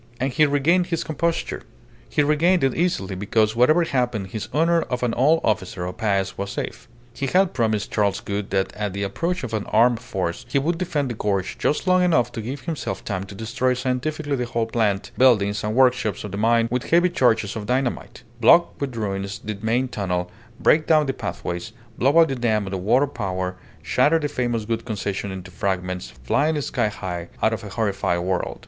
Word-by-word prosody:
And 130 +1 -1
he 155 +3 +4
regained 165 +6 +2
his 165 -3 -1
composure. 165 +2 -2 0.5
He 150 - +2
regained 160 +4 +3
it 135 -2 +2
easily, 160 - -1
because 105 +3 +1
whatever 155 +9 +4
happened 125 - -1
his 110 +3 -5
honour 165 +2 +3
of 125 -4 -3
an 120 -2 +1
old 155 +6 +3
officer 95 -4 -1
of 90 +4 -6
Paez 100 -4 -1
was 100 0 -3
safe. - - -5 0.3
He 135 +3 -3
had 185 +4 +3
promised 110 -3 0
Charles 100 -2 +1
Gould 100 0 -4
that 95 -1 0
at 105 -2 -3
the 100 +1 -3
approach 165 - -2
of 120 -3 -5
an 105 -2 -2
armed 115 +1 +4
force 95 -8 -3
he 130 - +1
would 165 +5 0
defend 150 -8 -1
the - - -2
gorge 100 -4 -1
just 150 - 0
long 185 0 +4
enough 140 -10 +2
to 115 - -5
give 130 +5 -5
himself 150 - -4
time 95 -1 -3
to 100 - -11
destroy 125 +4 0
scientifically 140 +4 -2
the 125 -2 -2
whole 115 -1 -1
plant, 110 -4 0
buildings, 105 -5 +4
and 105 +1 -2
workshops 125 -6 +2
of 105 - -6
the - - -4
mine 115 +2 +3
with 125 0 -2
heavy 175 +1 +4
charges 115 - +2
of 105 -2 -5
dynamite; 125 0 -2 0.2
block 170 +9 +5
with 135 -4 -3
ruins 100 -2 -3
the 110 0 -5
main 120 +4 +1
tunnel, 90 -6 -2 0.3
break 155 0 +3
down 155 -2 +4
the 135 - -1
pathways, 100 -2 -5 0.3
blow 140 +6 +3
up 165 -1 +7
the 135 - -2
dam 110 -4 0
of 95 - -6
the 95 - -2
water 120 +9 +3
power, 95 -8 -3 0.3
shatter 165 +3 +3
the 150 -2 -1
famous 120 -6 -2
Gould 115 +1 -2
Concession 100 -3 -3
into 95 -1 -8
fragments, 90 -5 -3
flying 150 - +1
sky 110 - 0
high 90 -4 -5 0.2
out 110 - +3
of 110 - -4
a 105 - -7
horrified 100 -5 -1
world. 90 0 -2
115 Hz, 205 wpm, -23 LUFS, 100-140 Hz, 0.5 s, up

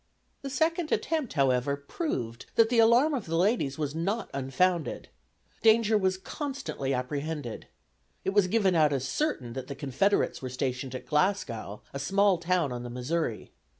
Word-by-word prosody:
The 275 - -5
second 320 +4 0
attempt, 310 -6 0
however, 135 0 +2
proved 135 - -4
that 225 -1 +5
the 240 -1 +3
alarm 240 +7 +5
of 245 -10 -3
the 165 - -1
ladies 175 - +1
was 150 -2 -2
not 195 +7 -2
unfounded. 150 +6 0 0.5
Danger 225 -1 +5
was 190 -2 +2
constantly 265 - -4
apprehended. 140 0 -3 0.6
It - - +1
was 200 -2 +4
given 195 -2 +2
out 155 -3 +4
as 135 -1 -1
certain 135 - -2
that 130 0 -6
the 140 - -6
Confederates 140 +9 +1
were 130 - -4
stationed 130 0 -3
at 130 - -6
Glasgow, 150 - -1
a 140 - -4
small 195 +5 +3
town 170 -4 +1
on 120 -1 -4
the 120 - -6
Missouri. 125 0 -3
160 Hz, 160 wpm, -28 LUFS, 135-215 Hz, 0.6 s, that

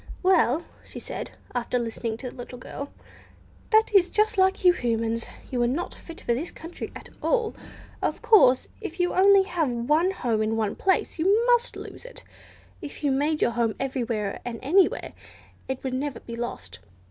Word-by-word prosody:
"Well," 340 -5 +3 0.2
said - - -7
she, - - -18 0.2
after 245 0 -1
listening 230 -1 -3
to 250 0 -6
the - - -16
little 245 0 -8
girl, 280 +3 -7 0.8
"that 440 -1 +4
is 370 -3 +5
just 425 +2 +2
like 380 -1 +2
you 360 - +8
Humans; 230 -3 -1 0.2
you 250 -2 0
are 240 - +3
not 295 +9 -2
fit 330 - -11
for 240 - 0
this 295 +9 -3
country 330 +2 -8
at - - -10
all! 465 -3 +1 0.5
Of - - -1
course, 260 - +6
if 370 -4 -6
you 355 0 +1
have 375 - +4
only 395 -1 +7 0.4
one 310 +7 +3
home 240 - -1
in 220 +1 0
one 215 -2 -1
place, 380 -2 0
you 405 +8 +3
must 485 0 +3
lose - - -9
it! - - -10 0.6
If 295 - -9
you 285 - +2
made 295 +3 +1
your 235 - +3
home 230 -2 0
everywhere 235 -6 -2
and 240 -2 -5
anywhere, 360 +8 +2 0.5
it 265 -1 -4
would 260 -1 -2
never 275 +1 -2
be 235 - -8
lost. 240 +1 -5
280 Hz, 180 wpm, -26 LUFS, 240-375 Hz, 0.8 s, you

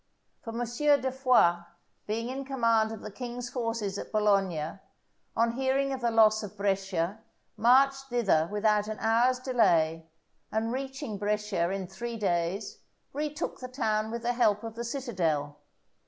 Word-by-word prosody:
For - - -8
M. 235 +2 -2
de 265 +2 +2
Foix 255 -10 +4 0.5
being 230 +3 -2
in 270 +2 -4
command 230 -5 +2
of 225 - -7
the 215 - -7
king's 245 +2 -6
forces 230 -5 -2
at - - -8
Bologna, 195 -6 +1 0.6
on 230 0 +3
hearing 270 +2 0
of 260 - -5
the 235 - +2
loss 215 -1 +5
of 210 -1 -8
Brescia, 195 -1 -1 0.4
marched 270 +3 +4
thither 215 -11 +1
without 210 0 +2
an 215 0 -4
hour's 240 +3 +3
delay, 170 -11 +2 0.4
and 225 +2 -1
reaching 265 -4 -5
Brescia 210 -4 0
in 195 0 -3
three 230 +6 -6
days, 190 0 -1 0.3
retook 300 +1 -3
the 255 - -6
town 220 -4 -1
with 235 +1 -5
the 240 +1 +1
help 215 -4 +2
of 225 -1 -6
the 235 +1 -5
citadel. 175 - -2
225 Hz, 155 wpm, -29 LUFS, 200-250 Hz, 0.6 s, loss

